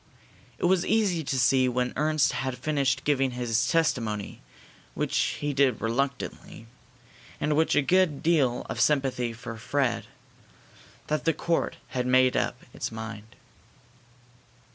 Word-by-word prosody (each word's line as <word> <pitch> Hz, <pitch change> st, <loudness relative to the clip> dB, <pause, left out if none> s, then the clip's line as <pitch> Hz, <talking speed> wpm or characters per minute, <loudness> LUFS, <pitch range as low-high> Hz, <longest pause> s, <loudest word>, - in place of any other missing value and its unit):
It -, -, -2 dB
was 185 Hz, 0 st, +3 dB
easy 200 Hz, -7 st, +1 dB
to 135 Hz, -2 st, -2 dB
see 130 Hz, +1 st, +3 dB
when 125 Hz, 0 st, -1 dB
Ernst 155 Hz, 0 st, +2 dB
had 130 Hz, -1 st, -3 dB
finished 140 Hz, 0 st, 0 dB
giving 135 Hz, -3 st, +1 dB
his 120 Hz, 0 st, 0 dB
testimony, 115 Hz, -11 st, -1 dB, 0.5 s
which -, -, -2 dB, 0.2 s
he 145 Hz, -1 st, -2 dB
did 135 Hz, -4 st, +2 dB
reluctantly, 125 Hz, -1 st, -3 dB, 0.7 s
and 150 Hz, 0 st, 0 dB
with 160 Hz, +1 st, +2 dB
a 150 Hz, -, +3 dB
good 180 Hz, -2 st, +2 dB
deal 145 Hz, -7 st, +2 dB
of 110 Hz, -1 st, -3 dB
sympathy 135 Hz, -3 st, +1 dB
for 115 Hz, 0 st, -8 dB
Fred, 125 Hz, 0 st, -1 dB, 1.0 s
that 155 Hz, 0 st, -2 dB
the 165 Hz, -, +3 dB
court 170 Hz, +1 st, -1 dB
had 125 Hz, -1 st, -2 dB
made 130 Hz, 0 st, +4 dB
up -, -, -1 dB
its -, -, -4 dB
mind. 110 Hz, -1 st, -8 dB
130 Hz, 135 wpm, -27 LUFS, 120-150 Hz, 1.0 s, made